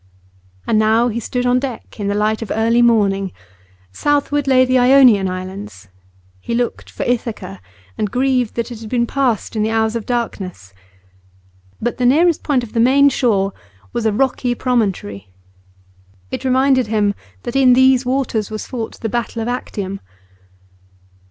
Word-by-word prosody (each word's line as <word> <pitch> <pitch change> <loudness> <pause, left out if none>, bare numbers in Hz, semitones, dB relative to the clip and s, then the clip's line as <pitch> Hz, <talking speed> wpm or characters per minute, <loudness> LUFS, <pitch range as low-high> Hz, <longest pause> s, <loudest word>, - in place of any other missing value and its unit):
And 215 - +2
now 220 +3 +3
he 235 +1 -3
stood 245 +2 -3
on 250 0 +3
deck 255 -4 -7
in 205 - -2
the 200 - 0
light 215 +2 0
of 225 - -6
early 230 +2 +2
morning. 200 -5 +2 0.6
Southward 290 - 0
lay 255 -1 +5
the 255 0 +2
Ionian 250 -6 +5
Islands; 185 - -7 0.5
he 235 - -4
looked 240 0 -2
for - - -5
Ithaca, 225 - -3 0.4
and 210 - 0
grieved 250 -1 0
that 235 +1 -3
it 235 - -7
had 220 -1 -9
been 235 0 +1
passed 245 -4 -1
in 215 - 0
the 215 - +1
hours 220 0 0
of 230 - -4
darkness. 190 - -4 1.1
But 240 +1 -2
the 250 - +3
nearest 325 +5 +3
point 270 -4 0
of 225 - -10
the 230 - 0
main 275 +4 +5
shore 200 -8 +1 0.4
was 230 -2 0
a - - +2
rocky 245 +1 0
promontory; 195 - -2 1.0
it - - -4
reminded 260 -1 +2
him 210 -2 +1 0.3
that 240 - -5
in 260 -2 +5
these 260 0 +4
waters 250 -5 -1
was 215 -1 -5
fought 235 -4 -6
the 225 - -2
battle 235 +1 -3
of 225 - -3
Actium. 200 -5 -4
235 Hz, 165 wpm, -18 LUFS, 210-255 Hz, 1.1 s, lay